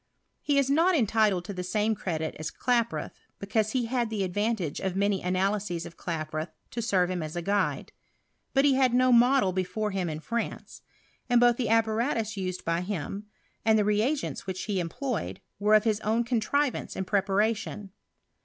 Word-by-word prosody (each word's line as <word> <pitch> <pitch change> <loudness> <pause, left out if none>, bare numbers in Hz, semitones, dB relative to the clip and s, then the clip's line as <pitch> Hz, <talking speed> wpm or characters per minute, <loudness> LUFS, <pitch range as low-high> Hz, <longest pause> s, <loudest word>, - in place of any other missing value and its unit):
He 290 -1 +1
u 275 - +3
not 345 +4 +4
entitled 215 - +2
to 200 - -5
the 180 - -4
same 210 +4 +1
credit 160 -6 -3
as 155 - -3
Klaproth, 235 -2 0 0.3
because 215 +2 -1
he 255 -3 +1
had 240 -1 -1
the 205 -4 -1
advant^e 205 -4 -2
of 190 -1 -1
many 200 0 +1
analyses 185 -1 -1
of 165 - -10
Klaproth 155 -1 -4 0.2
to 235 - -3
serve 185 -5 +1
him 180 -2 -2
as 155 +1 -5
a 175 - -2
guide. 200 +3 0 0.6
But 270 +1 +5
he 280 - +5
hail 260 -1 +4
no 255 +1 +4
model 245 -4 +5
be 185 0 +1
fore 210 +4 -3
him 190 -3 -1
in 155 -1 -4
France; 230 +9 -4 0.5
and 245 -1 +5
both 240 -1 +5
the 235 -4 -1
apparatus 225 0 +1
used 185 -2 -4
by 165 +1 0
him, 200 +2 -4 0.4
and 220 -1 +4
the 210 - +2
reagents 215 +5 0
which 185 0 -3
he 205 -3 -1
employed, 215 - -3 0.2
were 210 +1 +4
of 215 - +5
his 215 -2 +1
own 220 +2 +1
contrivance 250 +3 0
and 190 - -3
preparation. 205 +1 0
210 Hz, 180 wpm, -28 LUFS, 185-235 Hz, 0.6 s, But